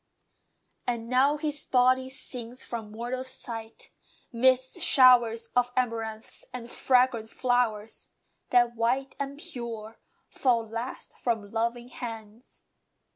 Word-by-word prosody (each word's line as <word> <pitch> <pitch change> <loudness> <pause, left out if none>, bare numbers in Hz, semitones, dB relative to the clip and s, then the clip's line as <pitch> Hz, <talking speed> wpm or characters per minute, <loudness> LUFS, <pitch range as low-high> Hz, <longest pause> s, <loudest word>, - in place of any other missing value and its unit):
And 235 -2 -2
now 270 +4 +4
"his 295 -1 -2
body" 255 +1 +3
sinks 250 -2 -7
from 225 -3 -5
mortal 240 +4 -4
sight, 230 -4 -7 0.4
Midst 260 +5 +2
showers 240 -5 +5
of 245 0 +3
amaranths, 225 -3 -2
and 240 -1 -7
fragrant 250 -3 +2
flowers, 230 -4 0 0.4
That, 240 -1 +4
white 250 +4 0
and 280 0 -4
pure, 235 -9 -7 0.3
fall 235 -4 +1
fast 230 +4 -6
from 220 -4 -1
loving 235 +2 -1
hands. 225 -1 -9
245 Hz, 110 wpm, -28 LUFS, 225-255 Hz, 0.4 s, showers